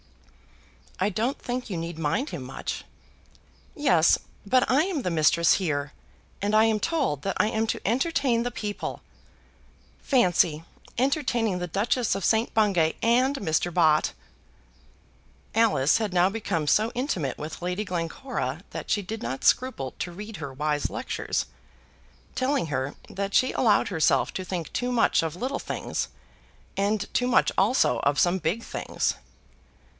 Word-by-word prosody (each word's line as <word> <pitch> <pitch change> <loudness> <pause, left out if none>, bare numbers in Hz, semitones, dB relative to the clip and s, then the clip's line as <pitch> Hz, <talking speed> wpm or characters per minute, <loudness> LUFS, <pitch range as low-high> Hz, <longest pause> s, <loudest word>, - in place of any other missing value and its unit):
"I 190 +3 +2
don't 230 +7 -1
think 245 -1 -4
you 185 - -3
need 165 0 -5
mind 165 - 0
him 145 - -6
much." 130 +1 -5 0.9
"Yes; 175 - +4 0.3
but 255 +5 +3
I 275 +4 +4
am 355 -6 -2
the 180 - -2
mistress 165 +1 +4
here, 145 -6 -2 0.5
and 205 +1 0
am 220 0 +4
told 270 - 0
that 195 - -2
I - - +4
am 220 0 0
to - - -3
entertain 260 0 +1
the 245 +1 -2
people. 210 -3 -5 1.0
Fancy 175 - +2 0.3
entertaining 245 -6 +1
the 180 - -3
Duchess 220 +6 0
of 195 - -2
St. 225 +1 +2
Bungay 190 -7 +3
and 255 +4 +3
Mr. 175 - 0
Bott!" 155 -3 +3 1.4
Alice 210 -11 +3
had 215 -4 -2
now 180 +1 +4
become 195 -7 -2
so 215 +9 +3
intimate 190 - -2
with 155 +3 -7
Lady 180 +4 -1
Glencora 170 - -3
that - - -6
she 205 - +1
did 220 +4 -6
not 135 - -4
scruple 250 - +1
to 175 - -3
read 210 +4 -8
her 140 -4 -6
wise 150 +1 -1
lectures, 255 - -2 0.9
telling 265 - 0
her 135 -1 -2
that 200 0 -4
she 255 - +4
allowed 210 -5 +3
herself 160 -6 +2
to 185 - -4
think 180 -3 -4
too 250 0 -1
much 235 -2 +3
of 165 -1 -3
little 260 +8 -3
things, - - -3 0.7
and 205 +1 0
too 245 - +1
much 255 - +3
also 260 - +3
of 140 0 +1
some 180 +2 +3
big 190 +8 -1
things. - - -2
200 Hz, 150 wpm, -26 LUFS, 165-245 Hz, 1.4 s, Yes